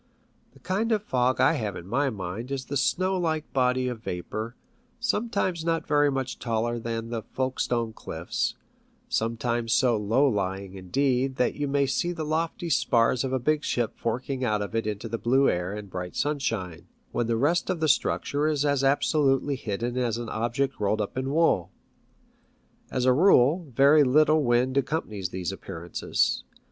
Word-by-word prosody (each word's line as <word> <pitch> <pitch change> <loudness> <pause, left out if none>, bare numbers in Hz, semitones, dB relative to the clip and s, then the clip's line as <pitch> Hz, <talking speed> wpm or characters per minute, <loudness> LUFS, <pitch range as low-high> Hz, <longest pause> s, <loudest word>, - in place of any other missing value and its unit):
The - - -19
kind 210 +5 -1
of 215 -2 +1
fog 130 -7 +1
I - - +5
have 105 -4 -3
in 85 - -8
my 135 +6 +1
mind 100 +3 -5
is 135 -1 -3
the 140 - -5
snow 185 +7 +1
like 160 -3 -2
body 125 -1 +2
of 120 -2 -4
vapour, 110 +5 -5 0.4
sometimes 210 -7 -1
not 165 0 0
very 145 -1 +3
much 135 -2 -3
taller 120 0 -1
than 115 0 -4
the 115 -2 -2
Folke 130 +4 -3
stone 115 -2 0
cliffs, - - -3 0.5
sometimes 115 0 -1
so 125 -2 +3
low 110 +7 +2
lying, 95 -4 -2
indeed, 130 +7 0
that 125 - +1
you 145 -1 -3
may 140 0 +2
see 175 +6 -1
the 165 -2 -4
lofty 165 +3 -2
spars 120 -3 +2
of 130 - -2
a 130 - +1
big 150 +4 0
ship 120 -3 -1
forking 130 +3 -3
out 105 -4 +1
of 100 - -7
it 115 -1 -1
into 105 +2 -3
the 115 0 -4
blue 135 +3 +3
air 90 +1 0
and 105 -2 -7
bright 90 -1 -5
sunshine, 115 - -2 0.2
when 120 - -1
the 115 -1 +1
rest 155 +11 +1
of 180 -3 -1
the 160 - +1
structure 145 +1 +1
is 150 -2 +1
as 140 -2 +1
absolutely 140 0 +2
hidden 120 +1 -3
as 120 -3 0
an 120 -1 -5
object 120 +5 -1
rolled 105 +1 +1
up 105 - -3
in 130 +1 -2
wool. 140 - +2 1.2
As 125 -1 -1
a 130 - +5
rule, 155 0 +4
very 145 +3 +6
little 155 +3 +4
wind 125 +1 +2
accompanies 110 - -1
these 90 -1 -3
appearances. 85 +1 -2
125 Hz, 175 wpm, -26 LUFS, 110-145 Hz, 1.2 s, very